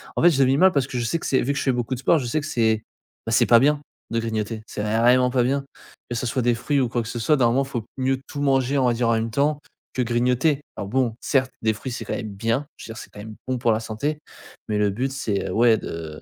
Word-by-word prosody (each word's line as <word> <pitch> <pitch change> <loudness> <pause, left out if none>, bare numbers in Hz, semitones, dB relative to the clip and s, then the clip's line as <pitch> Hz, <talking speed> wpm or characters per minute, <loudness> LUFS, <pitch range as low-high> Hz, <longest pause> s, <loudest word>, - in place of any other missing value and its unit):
en - - 0
fait, 175 - +7
je 135 -2 +1
le 130 - +5
vis 135 - +3
mal 190 +2 +6
parce 140 -4 0
que 125 - -5
je 120 - -1
sais 165 +7 0
que - - -8
c'est 130 - +2
vu 140 +3 0
que - - -2
je - - -2
fais 135 - +2
beaucoup 125 +1 -2
de 125 - -3
sport, 160 - +3
je 135 - -2
sais 120 +6 0
que - - -7
c'est, 110 -2 +2 0.5
bah, 115 - -3
que - - +4
c'est - - +4
pas 115 -1 +6
bien, 145 +1 +3 0.3
de 115 - 0
grignoter. 110 -1 -3
C'est 105 - -5
vraiment 120 +4 +3
pas 125 -1 +2
bien, 135 +2 0 0.5
que 120 - -3
ça 120 - -2
soit 125 +2 0
des 120 0 +2
fruits 140 +4 0
ou 125 -3 +1
quoi 120 0 -1
que - - -8
ce 120 - -4
soit, 150 +6 +3
normalement, 125 +2 +3
faut 120 -5 -5
mieux 130 0 0
tout 145 - -6
manger, 135 0 +2
on 130 - +3
va 120 - +3
dire, 115 0 0
en - - +4
même 115 0 0
temps, 145 +3 +1 0.3
que 130 - -1
grignoter. 125 +5 +1
Alors, 100 - -5
bon, 120 -2 +1
certes, 130 -2 +1
des 110 -1 +3
fruits 125 +4 -6
c'est - - -5
quand - - -3
même 110 -3 -4
bien, 115 +8 -1
je - - -11
veux 115 - -7
dire - - -12
c'est - - -12
quand - - -17
même 110 0 -8
bon 130 -1 -1
pour 120 -1 +2
la 110 - +1
santé. 140 +8 -3 0.5
Mais, 105 -1 -1
le 105 -1 +2
but 130 +6 -2
c'est, 110 -7 -2
ouais, 115 -1 +4
de, 80 -2 -7
120 Hz, 305 wpm, -23 LUFS, 115-135 Hz, 0.5 s, fait